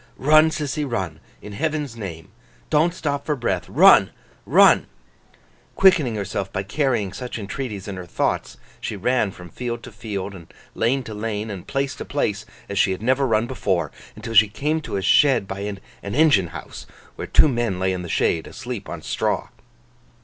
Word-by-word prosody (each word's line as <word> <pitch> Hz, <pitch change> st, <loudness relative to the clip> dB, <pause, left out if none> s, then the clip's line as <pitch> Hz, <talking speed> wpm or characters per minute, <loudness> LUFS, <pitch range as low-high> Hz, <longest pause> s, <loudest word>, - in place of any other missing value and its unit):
Run, 155 Hz, +4 st, +5 dB
Sissy, 150 Hz, -1 st, -2 dB
run, 95 Hz, -, -3 dB, 0.2 s
in 105 Hz, -, -8 dB
Heaven's 150 Hz, 0 st, -2 dB
name! 85 Hz, -8 st, -8 dB, 0.4 s
Don't 160 Hz, +3 st, +4 dB
stop 145 Hz, -5 st, -3 dB
for 150 Hz, -, -1 dB
breath. 105 Hz, -8 st, -2 dB
Run, -, -, +7 dB, 0.4 s
run! -, -, +6 dB, 0.9 s
Quickening 160 Hz, -, +4 dB
herself 100 Hz, -1 st, -3 dB
by 95 Hz, -1 st, -2 dB
carrying 110 Hz, -4 st, 0 dB
such 125 Hz, +1 st, -6 dB
entreaties 105 Hz, -1 st, -5 dB
in 100 Hz, -2 st, -5 dB
her 90 Hz, -1 st, -7 dB
thoughts, -, -, -1 dB, 0.2 s
she -, -, -4 dB
ran 115 Hz, +1 st, +1 dB
from 90 Hz, -2 st, -12 dB
field 120 Hz, -1 st, -4 dB
to -, -, -9 dB
field, 105 Hz, -3 st, -5 dB
and 85 Hz, -4 st, -12 dB, 0.2 s
lane 130 Hz, +4 st, +1 dB
to 110 Hz, -, -8 dB
lane, 105 Hz, 0 st, -3 dB
and 95 Hz, -3 st, -8 dB
place 135 Hz, 0 st, -1 dB
to -, -, -5 dB
place, 105 Hz, -7 st, -2 dB, 0.2 s
as 100 Hz, -1 st, -2 dB
she 95 Hz, -, +3 dB
had 95 Hz, -, -7 dB
never 130 Hz, +3 st, +2 dB
run 110 Hz, -1 st, +2 dB
before; 95 Hz, -, -1 dB, 0.2 s
until 115 Hz, -, -7 dB
she 110 Hz, 0 st, +7 dB
came 150 Hz, +9 st, -1 dB
to 150 Hz, -, -4 dB
a 95 Hz, -, -3 dB
shed 135 Hz, -7 st, +4 dB
by 95 Hz, +1 st, -5 dB
an 100 Hz, -1 st, -4 dB, 0.2 s
engine 105 Hz, -, +3 dB
house, 80 Hz, -, -9 dB, 0.3 s
where -, -, -6 dB
two -, -, +5 dB
men 120 Hz, -8 st, -1 dB
lay 95 Hz, 0 st, +1 dB
in 90 Hz, -, -3 dB
the 85 Hz, -, -7 dB
shade, 80 Hz, 0 st, +1 dB
asleep 120 Hz, -3 st, -7 dB
on -, -, -7 dB
straw. -, -, -1 dB
110 Hz, 180 wpm, -22 LUFS, 95-135 Hz, 0.9 s, Run